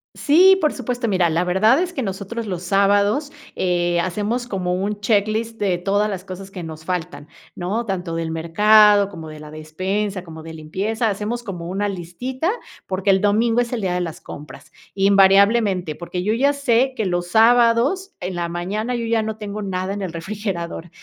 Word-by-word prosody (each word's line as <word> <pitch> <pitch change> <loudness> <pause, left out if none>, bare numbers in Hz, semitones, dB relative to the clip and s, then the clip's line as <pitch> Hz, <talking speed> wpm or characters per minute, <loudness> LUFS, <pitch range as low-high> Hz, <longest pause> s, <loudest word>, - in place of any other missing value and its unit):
Sí, 370 +6 +5
por 305 -5 +1
supuesto. 245 -2 -3
Mira, 185 -4 +2
la 165 +2 +1
verdad 205 - +3
es 360 0 -2
que 275 - -3
nosotros 210 +2 -4
los 180 -2 -4
sábados, 205 - +2 0.2
eh, 175 -1 +1
hacemos 210 +8 -2
como 185 -5 -2
un 200 +3 -2
checklist 215 +2 0
de 190 -4 +1
todas 200 +4 0
las 185 -2 -5
cosas 190 +1 -8
que 185 -3 -8
nos 160 -1 -9
faltan, 180 -4 -4 0.3
¿no? 205 +7 -2
Tanto 180 -5 -3
del 165 -1 -3
mercado, 205 +5 +5
como 165 -5 -9
de 155 - -10
la 150 0 -11
despensa, 185 +5 -3
como 160 -2 -10
de 160 0 -9
limpieza, 205 +9 -2
hacemos 210 +4 -3
como 180 -6 -6
una 200 +3 -1
listita, 225 - -4 0.4
porque 190 +1 +1
el 190 0 +3
domingo 225 +3 +2
es 240 - -3
el 230 - -2
día 185 -2 -1
de 180 - -1
las 165 -3 -5
compras, 140 -2 -11 0.2
invariablemente, 195 -2 +4
porque 180 +3 -5
yo, 215 - +1
ya 275 +5 +2
sé 265 -2 +1
que 220 - -2
los 175 -1 -1
sábados 235 - +3
en 180 0 -4
la 170 -1 -2
mañana 205 +8 -3
yo 235 - -3
ya 225 0 +1
no 220 0 -4
tengo 210 0 -6
nada 190 -1 -3
en 200 - -5
el 185 - -4
refrigerador. 175 -2 -5
200 Hz, 190 wpm, -21 LUFS, 175-225 Hz, 0.4 s, Sí